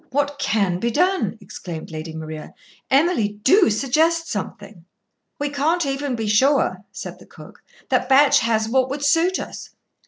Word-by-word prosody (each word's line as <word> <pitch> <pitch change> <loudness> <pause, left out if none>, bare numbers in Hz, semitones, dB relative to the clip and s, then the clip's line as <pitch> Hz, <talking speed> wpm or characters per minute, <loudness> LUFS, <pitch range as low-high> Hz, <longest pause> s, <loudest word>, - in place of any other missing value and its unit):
"What 285 +1 -1
can 205 -10 0
be 235 - 0
done?" 295 - 0
exclaimed 170 -5 -8
Lady 160 0 -7
Maria. 155 -1 -8 0.3
"Emily, 270 - +2
do 375 - +5
suggest 315 +9 +1
something." 200 -3 -6 0.5
"We 290 0 -2
can't 310 +4 0
even 275 -1 -2
be 225 -1 -3
sure," 210 -3 +2
said - - -8
the - - -16
cook, - - -15 0.3
"that - - +1
Batch 275 +2 +6
has 225 -2 0
what 260 +2 +1
would 280 +1 -3
suit 330 +6 +3
us. - - -8
265 Hz, 155 wpm, -21 LUFS, 205-290 Hz, 0.5 s, Batch